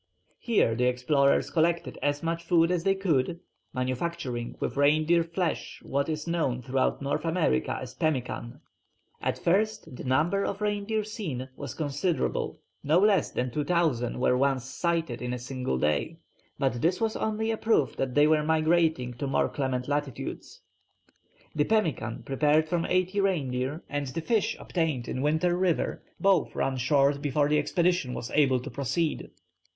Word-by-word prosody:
Here 220 Hz, -, +2 dB
the 125 Hz, +2 st, +1 dB
explorers 140 Hz, +3 st, +2 dB
collected 170 Hz, +1 st, 0 dB
as 145 Hz, +1 st, 0 dB
much 165 Hz, 0 st, -1 dB
food 165 Hz, 0 st, +3 dB
as 175 Hz, -2 st, 0 dB
they 195 Hz, +1 st, +3 dB
could, 170 Hz, -4 st, 0 dB, 0.3 s
manufacturing 130 Hz, -1 st, -3 dB
with -, -, -2 dB
reindeer 155 Hz, +4 st, +3 dB
flesh 170 Hz, 0 st, -3 dB
what 140 Hz, +3 st, -1 dB
is 155 Hz, -1 st, -3 dB
known 155 Hz, -8 st, -1 dB
throughout 130 Hz, +2 st, 0 dB
North 145 Hz, +2 st, -1 dB
America 165 Hz, -, +1 dB
as 125 Hz, -1 st, -8 dB
pemmican. 130 Hz, -4 st, -2 dB, 0.6 s
At -, -, -1 dB
first 210 Hz, -3 st, 0 dB
the -, -, -8 dB
number 160 Hz, +10 st, +2 dB
of 200 Hz, -, -3 dB
reindeer 210 Hz, +1 st, -1 dB
seen 170 Hz, -, -5 dB
was 140 Hz, -, -7 dB
considerable; 155 Hz, +3 st, -1 dB, 0.2 s
no 155 Hz, +4 st, +3 dB
less 195 Hz, -3 st, +4 dB
than 125 Hz, 0 st, -2 dB
2000 150 Hz, -5 st, 0 dB
were 125 Hz, 0 st, +3 dB
once 135 Hz, -1 st, +1 dB
sighted 165 Hz, -3 st, -2 dB
in 125 Hz, 0 st, -3 dB
a -, -, -2 dB
single 125 Hz, -, -3 dB
day, 75 Hz, -, 0 dB, 0.4 s
but 135 Hz, -4 st, 0 dB
this 180 Hz, +3 st, +2 dB
was 225 Hz, -1 st, 0 dB
only 220 Hz, +1 st, -1 dB
a 220 Hz, -, -1 dB
proof 215 Hz, -, +1 dB
that 130 Hz, -2 st, -2 dB
they 145 Hz, 0 st, +6 dB
were 155 Hz, 0 st, +4 dB
migrating 160 Hz, -4 st, +2 dB
to 140 Hz, -, -2 dB
more 135 Hz, -, +1 dB
clement 130 Hz, -3 st, -2 dB
latitudes. 145 Hz, -3 st, -4 dB, 0.9 s
The 150 Hz, -1 st, +1 dB
pemmican 155 Hz, -, 0 dB
prepared 150 Hz, +3 st, +2 dB
from 170 Hz, +1 st, -1 dB
eighty 185 Hz, +2 st, +1 dB
reindeer 145 Hz, -5 st, -1 dB
and 145 Hz, -1 st, -3 dB
the 130 Hz, +6 st, -4 dB
fish 220 Hz, +5 st, 0 dB
obtained 160 Hz, -9 st, -2 dB
in 130 Hz, -, -3 dB
Winter 160 Hz, +4 st, +2 dB
River 180 Hz, -2 st, 0 dB, 0.2 s
both 195 Hz, -4 st, +2 dB
run 135 Hz, -1 st, 0 dB
short 140 Hz, +2 st, +2 dB
before 145 Hz, 0 st, +1 dB
the 150 Hz, 0 st, +3 dB
expedition 175 Hz, -4 st, +1 dB
was 115 Hz, -, -5 dB
able 135 Hz, -4 st, +3 dB
to 140 Hz, +2 st, -7 dB
proceed. 140 Hz, +5 st, -1 dB
150 Hz, 160 wpm, -28 LUFS, 130-170 Hz, 0.9 s, they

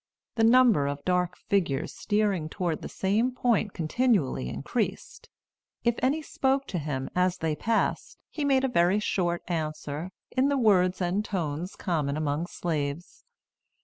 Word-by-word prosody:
The 225 Hz, -, +1 dB
number 230 Hz, -, +5 dB
of 145 Hz, 0 st, -4 dB
dark 180 Hz, -1 st, +1 dB
figures 170 Hz, -6 st, -1 dB
steering 205 Hz, -7 st, 0 dB
toward 170 Hz, -1 st, -2 dB
the -, -, -6 dB
same 215 Hz, +6 st, +1 dB
point 230 Hz, -5 st, +1 dB
continually 165 Hz, -, +1 dB
increased. -, -, -4 dB, 0.5 s
If 235 Hz, 0 st, +3 dB
any 290 Hz, +5 st, +1 dB
spoke 270 Hz, -1 st, 0 dB
to 180 Hz, -, -2 dB
him 140 Hz, -3 st, -3 dB
as 180 Hz, 0 st, +2 dB
they 160 Hz, -1 st, -1 dB
passed, 225 Hz, +7 st, -1 dB
he 300 Hz, -, -3 dB
made 270 Hz, -2 st, +3 dB
a -, -, +3 dB
very 190 Hz, -4 st, +3 dB
short 175 Hz, -4 st, -1 dB
answer, 155 Hz, -1 st, -3 dB, 0.2 s
in 265 Hz, +2 st, +2 dB
the 280 Hz, -, +1 dB
words 185 Hz, -6 st, +3 dB
and 180 Hz, +4 st, 0 dB
tones 175 Hz, -3 st, -3 dB
common 150 Hz, -6 st, -1 dB
among 155 Hz, +2 st, -1 dB
slaves. 155 Hz, -1 st, -4 dB
180 Hz, 145 wpm, -27 LUFS, 155-225 Hz, 0.5 s, number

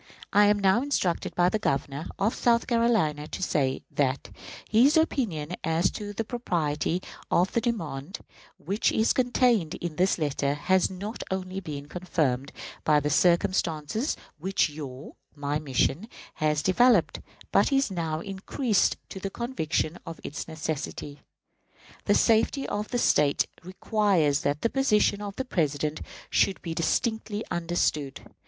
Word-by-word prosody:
I 205 Hz, 0 st, +6 dB
am 205 Hz, 0 st, +4 dB
now 195 Hz, +3 st, +3 dB
instructed 260 Hz, -11 st, -1 dB
by 175 Hz, 0 st, +4 dB
the 215 Hz, -, -1 dB
Governor 140 Hz, -4 st, -2 dB
of 205 Hz, +4 st, +1 dB
South 235 Hz, -1 st, +2 dB
Carolina 220 Hz, -, +1 dB
to 190 Hz, -, -5 dB
say 135 Hz, -6 st, 0 dB
that 140 Hz, -1 st, -1 dB, 0.4 s
"his 255 Hz, +8 st, +5 dB
opinion 195 Hz, -, 0 dB
as 165 Hz, +2 st, +1 dB
to 205 Hz, -1 st, -6 dB
the 205 Hz, +2 st, -3 dB
propriety 175 Hz, -, -1 dB, 0.3 s
of 180 Hz, +2 st, +2 dB
the 235 Hz, -, +2 dB
demand 185 Hz, -, -3 dB, 0.4 s
which 195 Hz, +8 st, 0 dB
is 220 Hz, +1 st, +2 dB
contained 245 Hz, -, +2 dB
in 170 Hz, -3 st, -5 dB
this 185 Hz, +2 st, +2 dB
letter 145 Hz, -2 st, 0 dB
has 185 Hz, +5 st, +2 dB
not 200 Hz, +5 st, -6 dB
only 190 Hz, 0 st, -3 dB
been 145 Hz, -6 st, -7 dB
confirmed 150 Hz, -6 st, -1 dB, 0.3 s
by 150 Hz, -1 st, +4 dB
the 150 Hz, 0 st, -1 dB
circumstances 170 Hz, -, +1 dB, 0.2 s
which 190 Hz, 0 st, +1 dB
your 140 Hz, -2 st, -9 dB, 0.2 s
(my) 145 Hz, 0 st, -2 dB
mission 150 Hz, -, 0 dB, 0.3 s
has 150 Hz, -1 st, +1 dB
developed, 215 Hz, 0 st, +4 dB, 0.3 s
but -, -, +3 dB
is 275 Hz, -5 st, +2 dB
now 165 Hz, -3 st, -2 dB
increased 200 Hz, +4 st, 0 dB
to 190 Hz, -, -8 dB
a 195 Hz, -, -1 dB
conviction 175 Hz, -, -2 dB
of 165 Hz, -1 st, -8 dB
its 145 Hz, -, -5 dB
necessity. 155 Hz, -2 st, -5 dB, 0.8 s
The -, -, +3 dB
safety 230 Hz, +5 st, +3 dB
of 210 Hz, +1 st, -3 dB
the 245 Hz, -, -2 dB
State 150 Hz, -10 st, +3 dB, 0.2 s
requires 185 Hz, -5 st, +1 dB
that 145 Hz, +1 st, -1 dB
the 230 Hz, -, +3 dB
position 210 Hz, -6 st, +2 dB
of 200 Hz, -1 st, -6 dB
the 265 Hz, -, -3 dB
President 150 Hz, -, -1 dB, 0.3 s
should 195 Hz, -, +2 dB
be 165 Hz, -2 st, -3 dB
distinctly 220 Hz, +5 st, -1 dB
understood. 165 Hz, -5 st, -1 dB
180 Hz, 145 wpm, -27 LUFS, 150-215 Hz, 0.8 s, I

